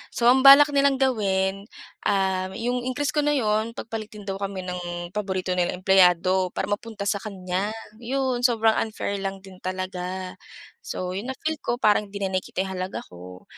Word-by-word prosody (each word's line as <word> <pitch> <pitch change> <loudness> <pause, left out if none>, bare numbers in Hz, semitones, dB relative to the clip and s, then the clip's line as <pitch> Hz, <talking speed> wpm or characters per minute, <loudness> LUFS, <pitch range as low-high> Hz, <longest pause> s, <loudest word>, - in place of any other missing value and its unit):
So 235 - +2
ang 265 - +4
balak 285 +2 +9
nilang 280 -1 +3
gawin, 195 -5 0 0.4
um, 190 -1 +1
yung 245 +3 -2
increase 285 +3 -1
ko - - +3
na 295 0 +2
'yon 220 -2 0
pagpalitin 215 -2 -7
daw 195 0 -3
kami 195 -1 -4
ng 175 -1 -5
paborito 190 -3 -2
nilang 180 0 -1
empleyado 185 -1 +4
para - - -1
mapunta 210 0 -4
sa 200 0 +1
kanya. 190 -1 -3 0.3
'Yon 255 0 -1
sobrang 225 -2 +2
unfair 210 -2 -3
lang 195 0 -4
din 190 -2 -13
talaga. 185 0 -4 0.5
So, 185 - -4
yung 205 +6 -4
na - - -7
feel 315 -1 -1
ko 240 - -1
parang 210 -2 +3
'di 200 0 -5
na 190 - -1
nakikita 185 0 -2
yung 190 - -5
halaga 185 +1 -4
ko. 90 +1 -11
200 Hz, 175 wpm, -24 LUFS, 185-230 Hz, 0.5 s, balak